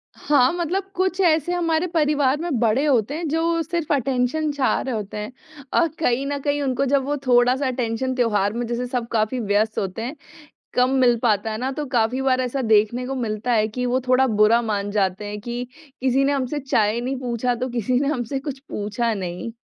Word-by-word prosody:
हाँ, 270 -4 +3
मतलब 355 +3 -2
कुछ 370 0 0
ऐसे 325 -2 +3
हमारे 335 -1 +1
परिवार 295 -5 +2
में 330 -8 -1
बड़े 235 +5 +2
होते 260 -3 +2
हैं 335 0 -3
जो 330 +2 +1
सिर्फ़ 330 -1 -2
अटेन्शन 270 +3 0
चाह 285 -2 +1
रहे 260 -3 -3
होते 210 -1 -5
हैं 210 +2 -5 0.5
और 335 - +4
कहीं 265 -3 +1
न 285 0 -2
कहीं 290 +1 0
उनको 270 -1 0
जब 275 0 +2
वो 290 +2 -1
थोड़ा-सा 250 +2 +4
अटेन्शन 255 0 -2
त्योहार 210 -5 +1
में 240 +1 -2
जैसे 240 +1 -2
सब 245 -2 -3
काफ़ी 220 +3 0
व्यस्त 215 0 0
होते 195 +3 -4
हैं, 250 +6 -4 0.6
कम 250 +1 +3
मिल 240 -2 +4
पाता 220 -1 +1
है 215 - -3
ना 255 +3 -2
तो 295 +2 -4
काफ़ी 240 +3 +1
बार 260 -1 +2
ऐसा 255 +2 -2
देखने 220 +2 +2
को 270 - -3
मिलता 230 -1 -2
है 215 -1 +3
कि 250 +3 -3
वो 250 +1 +1
थोड़ा 255 +1 +4
बुरा 215 +1 +4
मान 205 -3 -2
जाते 195 -1 0
हैं 205 0 -5
कि 240 +2 -4 0.4
किसी 265 +1 +2
ने 275 - +2
हमसे 275 +1 -2
चाय 230 -5 +1
नहीं 260 +2 -2
पूछा 245 -1 -1
तो 255 +2 -3
किसी 245 +1 0
ने 280 - 0
हमसे 270 -1 -2
कुछ 275 -1 -6
पूछा 220 +3 -1
नहीं। 185 +3 -5
250 Hz, 210 wpm, -22 LUFS, 225-280 Hz, 0.6 s, और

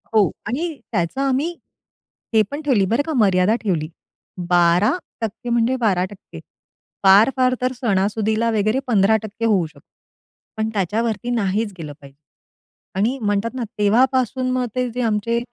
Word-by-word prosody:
हो. 210 -3 +5 0.2
आणि 305 +7 -3
त्याचं 180 +5 -1
आम्ही 275 +5 0 0.8
हे 220 - +5
पण 290 +2 -4
ठेवली 255 -10 +2
बरं 230 +8 +1
का 320 - -3
मर्यादा 200 -2 +3
ठेवली. 165 -7 -1 0.6
12% 205 - +1
म्हणजे 235 +2 +2
12% 190 0 -2 0.6
फार-फार 255 +7 +5
तर 255 - +1
सणासुदीला 220 0 0
वगैरे 215 +3 +1
15% 220 0 +1
होऊ 200 -6 +2
शकतो. 160 - -20 0.7
पण 220 0 -1
त्याच्यावरती 215 +4 -1
नाहीच 210 -2 -1
गेलं 150 -3 -7
पाहिजे. 140 0 -15 0.8
आणि 225 +8 +1
म्हणतात 205 +2 -1
ना 250 - -2
तेव्हापासून 255 +4 +2
मग 255 0 0
ते 250 -1 0
जे 250 +2 -3
आमचे 230 0 0
220 Hz, 130 wpm, -21 LUFS, 200-250 Hz, 0.8 s, हो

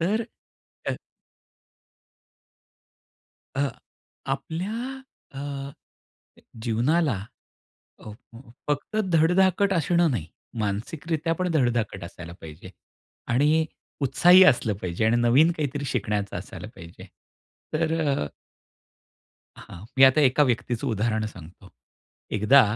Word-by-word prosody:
तर 215 +7 0 0.6
अ - - -1 2.6
अ, 140 0 +1 0.6
आपल्या 225 +11 -4 0.3
अ, 135 - -9
अ, 140 -1 -5 0.9
जीवनाला 130 - +1 0.8
अ, 110 - -10
फ 115 +2 -16 0.3
फक्त 145 +9 -2 0.2
धडधाकट 190 +4 +3
असणं 170 0 +2
नाही 85 -11 -2 0.3
मानसिकरित्या 155 +11 -2
पण 180 - +1
धडधाकट 120 - 0
असायला 85 -1 -9
पाहिजे 80 +3 -11 0.6
आणि 150 +5 +3 0.4
उत्साही 175 +8 +6
असलं 120 - +3
पाहिजे 90 +4 -1
आणि 115 +2 +3
नवीन 120 +7 +5
काहीतरी 145 -3 -3
शिकण्याचं 105 -5 -2
असायला - - -9
पाहिजे 85 +1 -12 0.7
तर 160 0 +1
अ 140 - 0 1.3
हां, 90 +4 -11
मी 135 - +9
आता 135 +3 +6
एका 135 +1 +4
व्यक्तीचं 120 0 0
उदाहरण 110 0 0
सांगतो. 90 -4 -12 0.6
एकदा, 110 +6 +5
135 Hz, 100 wpm, -25 LUFS, 110-160 Hz, 2.6 s, मी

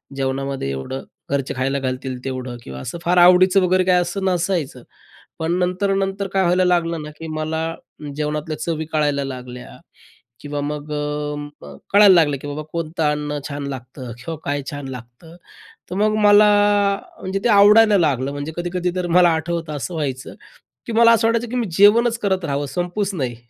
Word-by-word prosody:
जेवणामध्ये 135 - -2
एवढं 70 - -5 0.3
घरचे 140 -1 -1
खायला 135 +2 -1
घालतील 130 0 -4
तेवढं 130 -2 -5
किंवा 65 0 -8
असं 170 - -6
फार 180 +1 +1
आवडीचं 185 +2 +6
वगैरे 185 0 +2
काही 180 -1 +4
असं 175 +3 -4
नसायचं. 175 -8 -1 0.6
पण 160 +1 -1
नंतर-नंतर 195 +2 -1
काय 195 -1 +2
व्हायला 180 +1 +2
लागलं 170 -2 +1
ना, 150 - -7
की 165 - -7
मला 160 +1 -3 0.4
जेवणातल्या 150 +1 -3
चवी 160 -2 -3
कळायला 145 -2 +1
लागल्या, 125 -2 -8 0.6
किंवा 145 0 -4
मग 150 +1 -5
अ 150 0 -3
म 145 0 -7 0.4
कळायला 200 -1 +8
लागलं 150 -4 +3
की - - -7
बाबा, 145 +1 -5
कोणतं 165 -1 -3
अन्न 150 0 -3
छान 145 -1 -5
लागतं, 130 -1 -8
किंवा 160 +6 -6
काय 145 0 -1
छान 145 -2 -6
लागतं. 125 +6 -11 0.6
तर - - -4
मग 215 +1 +2
मला, 205 +1 +7 0.7
म्हणजे 190 +1 -3
ते - - +3
आवडायला 210 +1 +6
लागलं. 140 -5 +1
म्हणजे 145 +2 -5
कधी-कधी 175 +1 -2
तर 180 -1 -1
मला 175 -1 +6
आठवतं, 165 0 -3
असं 160 +5 -5
व्हायचं, 135 -5 -4 0.5
की - - -4
मला 230 +1 +6
असं 225 0 +2
वाटायचं 230 +1 0
की 250 - -5
मी 235 -3 -1
जेवणच 230 +4 +5
करत 190 -4 -1
राहावं, 145 -1 -2
संपूच 180 +5 -2
नाही. 130 -7 -3
160 Hz, 170 wpm, -20 LUFS, 140-185 Hz, 0.7 s, कळायला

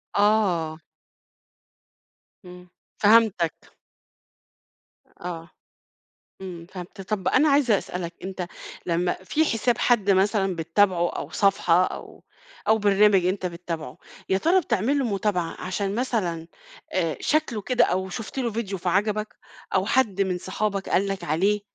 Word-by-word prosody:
آه. 195 -7 +2 1.7
إمم، 180 0 -12 0.3
فهمتك. 205 -6 +3 1.4
آه، 170 -1 -6 0.9
إمم، 175 -3 -8
فهمت. 185 +2 -9
طب 195 -1 -2
أنا 295 +4 +4
عايزة 275 -7 +4
أسألك 175 -1 -6
أنت 190 -2 -4 0.4
لمّا 175 0 +1
في 315 +10 +1
حساب 235 -2 +1
حد 215 -5 +2
مثلًا 195 -1 +2
بتتابعه 175 +2 +2
أو 145 - -6
صفحة 185 -2 +3
أو - - -7 0.4
أو 220 0 +5
برنامج 200 -2 +4
أنت 185 0 -1
بتتابعه، 170 -2 -6 0.3
يا 190 - +2
ترى 360 - +3
بتعمل 275 - 0
له 275 - 0
متابعة 195 -6 -1
عشان 195 +2 -2
مثلًا 195 -10 -1 0.5
آآ 165 -5 0
شكله 305 -8 0
كده 250 +3 +3
أو 190 +1 -1
شُفت 225 +7 -6
له 240 -3 0
فيديو 205 -4 -3
فعجبك 205 +4 -1 0.4
أو 190 +1 +2
حد 215 -5 +1
من 185 -2 -1
صحابك 195 +1 -3
قال 195 +2 +2
لك 195 -1 -4
عليه 195 +7 +1
195 Hz, 125 wpm, -25 LUFS, 180-215 Hz, 1.7 s, أو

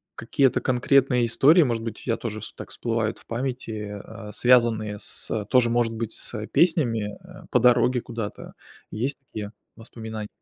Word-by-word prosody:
какие-то 130 +3 +1
конкретные 125 -1 +2
истории, 150 +8 +5
может 115 -4 -1
быть 115 -2 -6
у - - -15
тебя 115 -2 0
тоже 110 -2 -5
вс 110 - -8
так - - -10
всплывают 115 -1 -2
в - - -20
памяти, 125 0 -4
э, 105 -1 -6
а, 110 -1 -10
связанные 110 -3 +3
с 105 -2 0
тоже, 125 -2 +3
может 115 -1 +1
быть, 115 0 -4
с 110 -2 -3
песнями, 115 - +1
э, - - -13
по - - +4
дороге 125 0 +3
куда-то. 115 -3 -7 0.4
Есть 130 +6 -2
такие 105 -1 -6 0.2
воспоминания? 110 -2 -8
115 Hz, 165 wpm, -24 LUFS, 110-125 Hz, 0.4 s, истории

